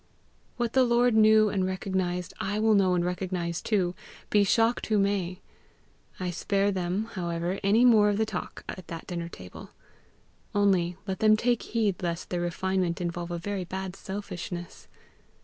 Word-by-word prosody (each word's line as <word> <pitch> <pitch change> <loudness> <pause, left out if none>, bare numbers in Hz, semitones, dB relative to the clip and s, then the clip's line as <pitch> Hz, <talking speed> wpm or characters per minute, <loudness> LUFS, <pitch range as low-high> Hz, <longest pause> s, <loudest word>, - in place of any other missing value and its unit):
What 240 -1 -1
the 260 - +5
Lord 240 0 +3
knew 215 0 +6
and 195 -2 0
recognized, 185 -1 -2
I 205 +2 -2
will 220 0 +3
know 190 -3 +4
and 175 -1 +1
recognize 180 -2 -2
too, 185 -5 0 0.4
be 205 -1 +5
shocked 225 +4 +2
who 215 - +2
may. 195 -3 0 0.8
I 180 -1 -2
spare 200 +3 +1
them, 185 +2 -1
however, 175 0 -2
any 215 +5 +4
more 215 -4 +6
of 205 - 0
the 220 - +2
talk - - -6
at 185 -3 -7
that 165 -1 -7
dinner 170 -1 -4
table. 90 - -11 0.9
Only 185 -4 +2
let 190 -2 -3
them 215 0 +5
take 240 +1 +1
heed 215 -5 -1
lest 170 -1 -3
their 175 -1 -1
refinement 180 0 -1
involve 175 0 -3
a 175 - -3
very 195 +2 -3
bad 190 +1 -5
selfishness. 180 -3 -7
190 Hz, 165 wpm, -27 LUFS, 175-210 Hz, 0.9 s, knew